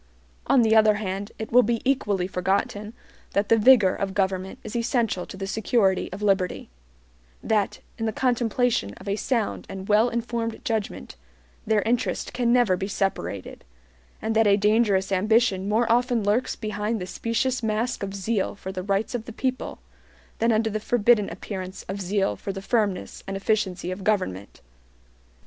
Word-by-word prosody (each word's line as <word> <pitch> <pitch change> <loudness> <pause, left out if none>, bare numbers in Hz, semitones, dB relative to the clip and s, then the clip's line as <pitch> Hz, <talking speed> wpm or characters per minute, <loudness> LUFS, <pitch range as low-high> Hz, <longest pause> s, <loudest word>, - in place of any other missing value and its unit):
On 255 - +5
the 220 0 +4
other 215 -1 +6
hand, 200 0 -4
it 220 - -6
will 250 +2 +7
be 235 -1 0
equally 210 -9 +1
forgotten 195 +3 -1 0.4
that 200 +1 +1
the 230 - +6
vigor 210 -5 +6
of 195 0 -3
government 190 -1 -1
is 220 - -7
essential 230 -5 0
to - - -9
the 195 - -4
security 200 -1 +1
of 195 +3 -6
liberty; 190 - 0 0.7
that, 210 -3 0 0.2
in 225 - -1
the - - 0
contemplation 240 - 0
of - - -13
a 200 - 0
sound 230 0 -1
and 190 0 -7
well 215 +3 +4
informed 235 -1 -3
judgment, 220 - -3 0.5
their 215 -1 +2
interest 235 +1 -1
can 240 -1 +1
never 240 -6 +4
be 190 +2 -3
separated; 195 - -3 0.6
and 220 0 -1
that 225 -1 +4
a 200 0 +5
dangerous 205 -2 +2
ambition 200 0 +2
more 225 +3 +2
often 245 -1 +2
lurks 210 +5 +1
behind 215 +1 -2
the 180 - -4
specious 230 +6 -1
mask 225 +2 -1
of 200 0 -4
zeal 200 +1 -1
for 190 -1 -7
the 185 -1 -4
rights 200 +4 -1
of 235 -2 -3
the 235 - -8
people 255 +3 -3 0.6
than 230 +1 +3
under 220 0 +1
the 215 - -2
forbidden 220 -1 +3
appearance 185 +1 -6
of 195 +1 -4
zeal 195 +1 0
for 195 - -5
the 195 - -6
firmness 210 -5 -1
and 195 0 -3
efficiency 195 -3 -1
of 185 +1 -6
government. 145 - -1
210 Hz, 170 wpm, -25 LUFS, 195-230 Hz, 0.7 s, will